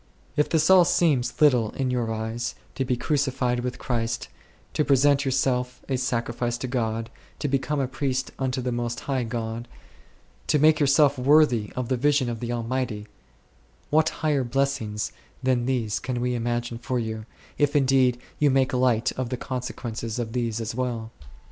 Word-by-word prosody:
If 150 Hz, -1 st, +2 dB
this 160 Hz, -1 st, +3 dB
all 185 Hz, -1 st, +8 dB
seems 150 Hz, -7 st, +1 dB
little 125 Hz, -8 st, +4 dB
in 130 Hz, -2 st, -1 dB
your 120 Hz, -3 st, -1 dB
eyes, 110 Hz, +2 st, -3 dB, 0.2 s
to 135 Hz, -, -1 dB
be 125 Hz, -1 st, 0 dB
crucified 130 Hz, -4 st, 0 dB
with 125 Hz, +1 st, -3 dB
Christ, 115 Hz, -2 st, -2 dB, 0.4 s
to 150 Hz, -, +2 dB
present 140 Hz, 0 st, +4 dB
yourself 125 Hz, -1 st, 0 dB
a 135 Hz, -, 0 dB
sacrifice 120 Hz, -1 st, -1 dB
to 130 Hz, -, -4 dB
God, 115 Hz, -2 st, -2 dB, 0.3 s
to -, -, -2 dB
become 140 Hz, +2 st, 0 dB
a 135 Hz, -, +1 dB
priest 130 Hz, 0 st, -2 dB
unto 130 Hz, -1 st, -1 dB
the 125 Hz, 0 st, -2 dB
most 120 Hz, 0 st, -2 dB
high 135 Hz, -3 st, -1 dB
God, 115 Hz, 0 st, -4 dB, 0.8 s
to -, -, +3 dB
make 155 Hz, +1 st, +5 dB
yourself 145 Hz, -1 st, +4 dB
worthy 125 Hz, -5 st, +4 dB
of 125 Hz, -2 st, -2 dB
the 130 Hz, -, +1 dB
vision 140 Hz, -1 st, +2 dB
of 115 Hz, -, -5 dB
the 120 Hz, -, -4 dB
Al 120 Hz, -1 st, -2 dB
mighty, 115 Hz, -4 st, -2 dB, 0.9 s
what 155 Hz, +1 st, +4 dB, 0.2 s
higher 145 Hz, -3 st, +2 dB
blessings 125 Hz, -4 st, -1 dB, 0.3 s
than 125 Hz, -2 st, +1 dB
these 120 Hz, -5 st, 0 dB
can 125 Hz, -2 st, -3 dB
we 125 Hz, 0 st, 0 dB
imagine 120 Hz, 0 st, -2 dB
for 125 Hz, +1 st, -2 dB
you, 110 Hz, -1 st, -4 dB, 0.3 s
if 145 Hz, 0 st, +2 dB
indeed 130 Hz, -3 st, +3 dB, 0.2 s
you 150 Hz, -, +4 dB
make 135 Hz, +1 st, +2 dB
light 125 Hz, -1 st, +2 dB
of 130 Hz, -2 st, -4 dB
the 125 Hz, -, -2 dB
consequences 120 Hz, -3 st, -4 dB
of 115 Hz, -2 st, -3 dB
these 115 Hz, -3 st, -1 dB
as 115 Hz, 0 st, -3 dB
well? 120 Hz, -2 st, -3 dB
125 Hz, 175 wpm, -25 LUFS, 120-135 Hz, 0.9 s, all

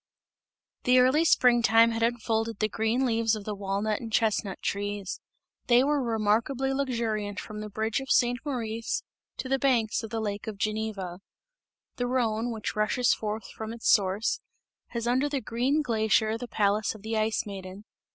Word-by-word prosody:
The 250 Hz, 0 st, +5 dB
early 260 Hz, +5 st, +5 dB
spring 250 Hz, -7 st, +5 dB
time 230 Hz, 0 st, +5 dB
had 225 Hz, 0 st, -3 dB
unfolded 230 Hz, -1 st, 0 dB
the 215 Hz, -, +1 dB
green 225 Hz, +4 st, 0 dB
leaves 225 Hz, -2 st, +2 dB
of 215 Hz, -, -7 dB
the 210 Hz, -, -4 dB
walnut 200 Hz, +2 st, -1 dB
and 230 Hz, -2 st, -7 dB
chestnut 215 Hz, -3 st, 0 dB
trees; 205 Hz, -1 st, -3 dB, 0.5 s
they 245 Hz, +1 st, +6 dB
were 290 Hz, 0 st, +1 dB
remarkably 235 Hz, +4 st, +1 dB
luxuriant 230 Hz, -6 st, -2 dB
from 215 Hz, -1 st, -7 dB
the 215 Hz, -, -6 dB
bridge 220 Hz, +3 st, -1 dB
of 270 Hz, -, -9 dB
St. 245 Hz, -1 st, +3 dB
Maurice 230 Hz, -5 st, -3 dB, 0.3 s
to -, -, -4 dB
the 270 Hz, +1 st, +1 dB
banks 245 Hz, -5 st, +2 dB
of 225 Hz, -, -7 dB
the 225 Hz, +1 st, -3 dB
lake 205 Hz, -1 st, -4 dB
of 215 Hz, -2 st, -5 dB
Geneva. 210 Hz, -4 st, -3 dB, 0.8 s
The 245 Hz, -, -1 dB
Rhone, 240 Hz, -2 st, 0 dB
which 220 Hz, -2 st, -4 dB
rushes 215 Hz, +4 st, +2 dB
forth 215 Hz, -2 st, -4 dB
from 220 Hz, 0 st, -6 dB
its 235 Hz, -, +1 dB
source, 200 Hz, +2 st, +2 dB, 0.5 s
has 235 Hz, -1 st, -4 dB
under 255 Hz, +4 st, +2 dB
the 280 Hz, -1 st, -1 dB
green 265 Hz, +6 st, 0 dB
glacier 220 Hz, -2 st, +2 dB
the 245 Hz, +2 st, -6 dB
palace 210 Hz, -1 st, +1 dB
of 215 Hz, -, -13 dB
the 220 Hz, +1 st, -3 dB
Ice 215 Hz, 0 st, 0 dB
Maiden. 195 Hz, -1 st, -8 dB
225 Hz, 170 wpm, -28 LUFS, 215-245 Hz, 0.8 s, they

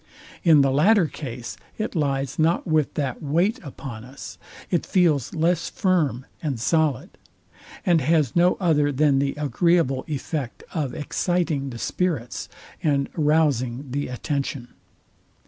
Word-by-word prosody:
In 160 Hz, -4 st, +6 dB
the 135 Hz, -1 st, +3 dB
latter 180 Hz, +7 st, +4 dB
case, 125 Hz, -6 st, -7 dB, 0.2 s
it 215 Hz, +1 st, -3 dB
lies 135 Hz, -3 st, -1 dB
not 165 Hz, +2 st, +2 dB
with 155 Hz, -3 st, +1 dB
that 140 Hz, -4 st, -2 dB
weight 175 Hz, -, +1 dB
upon 135 Hz, -6 st, -8 dB
us: 130 Hz, +3 st, -10 dB, 0.3 s
It 175 Hz, -, +2 dB
feels 170 Hz, -, +1 dB
less 170 Hz, +1 st, +1 dB
firm 155 Hz, -, 0 dB, 0.2 s
and 140 Hz, -7 st, -2 dB
solid: 155 Hz, -, +1 dB, 0.7 s
And 170 Hz, -4 st, +4 dB
has 150 Hz, -2 st, +2 dB
no 175 Hz, +1 st, +4 dB
other 150 Hz, -6 st, +2 dB
than 140 Hz, 0 st, +3 dB
the 140 Hz, 0 st, 0 dB
agreeable 150 Hz, -1 st, +1 dB
effect 145 Hz, -3 st, -4 dB
of 150 Hz, -6 st, -2 dB
exciting 155 Hz, -3 st, -1 dB
the 120 Hz, -, -7 dB
spirits, 145 Hz, -4 st, -2 dB, 0.3 s
and 140 Hz, -3 st, +1 dB
rouzing 145 Hz, -5 st, +1 dB
the 145 Hz, +2 st, -2 dB
attention. 135 Hz, -1 st, -3 dB
150 Hz, 130 wpm, -24 LUFS, 135-165 Hz, 0.7 s, In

